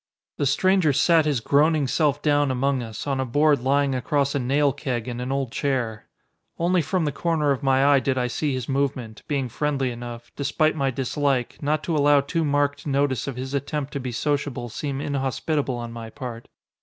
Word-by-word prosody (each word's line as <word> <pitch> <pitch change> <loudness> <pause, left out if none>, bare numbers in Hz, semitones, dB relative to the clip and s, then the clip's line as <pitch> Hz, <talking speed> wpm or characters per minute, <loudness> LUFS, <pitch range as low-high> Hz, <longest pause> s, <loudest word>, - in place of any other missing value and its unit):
The 145 - +2
stranger 185 0 +3
sat 160 +3 +4
his 145 -6 0
groaning 150 +4 +3
self 145 +1 +1
down 145 -2 +3
among 130 +1 0
us, 110 -2 -6
on 135 -2 -1
a - - +1
board 145 +4 +3
lying 140 +2 +1
across 140 +2 0
a 140 - 0
nail 140 +2 +2
keg 120 -4 -3
and 120 0 -4
an 125 +2 -3
old 135 -3 -1
chair. 120 -7 -2 0.5
Only 175 +1 +2
from 175 +2 -1
the 145 - 0
corner 155 -2 0
of 135 -1 -1
my 135 -1 +3
eye 140 -1 +5
did 130 0 -1
I 125 - +1
see 140 +5 -1
his 130 -3 -3
movement, 135 -5 -2
being 140 -4 -1
friendly 135 0 -1
enough, 120 0 -8
despite 155 +3 +1
my 135 -3 +1
dislike, 135 0 -1
not 155 +1 0
to 165 - -1
allow 145 -1 +5
too 160 +4 -1
marked 145 0 0
notice 140 -3 0
of 135 - -4
his 130 +2 -5
attempt 145 0 -3
to 140 - -2
be 125 -1 -4
sociable 140 -2 -2
seem 140 +3 -4
inhospitable 140 0 -1
on 120 -1 -6
my 115 -1 -7
part. 120 -2 -8
140 Hz, 200 wpm, -24 LUFS, 130-145 Hz, 0.5 s, eye